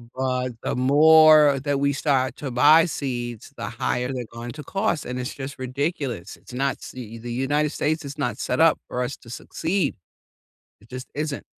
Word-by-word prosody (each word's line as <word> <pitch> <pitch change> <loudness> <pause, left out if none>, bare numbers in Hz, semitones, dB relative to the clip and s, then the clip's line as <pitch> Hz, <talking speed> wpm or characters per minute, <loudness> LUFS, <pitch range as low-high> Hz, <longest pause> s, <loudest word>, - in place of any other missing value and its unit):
But, 130 -1 -1
the - - -1
more 150 +2 +6
that 145 -1 0
we 140 0 +2
start 135 -2 0
to 140 - -5
buy 150 +7 +6
seeds, 120 - -4
the - - -4
higher 125 +1 -2
they're 125 -2 -4
going 115 +1 -7
to 150 0 -9
cost, 195 -5 -1
and 125 0 -4
it's 125 - -4
just 140 0 -7
ridiculous, 130 - -3
it's - - -15
not 135 +2 -1
see 115 -3 -8
the 120 +1 -7
United 145 +5 0
States 155 +2 -1
is 140 +2 -7
not 125 -7 -2
set 125 - -2
up 165 -1 +5
for 125 - -3
us 125 +2 -3
to 115 - -16
succeed. 165 - -2 0.9
It 105 - -21
just 125 +1 -8
isn't. 150 -1 -3
135 Hz, 185 wpm, -24 LUFS, 125-150 Hz, 0.9 s, more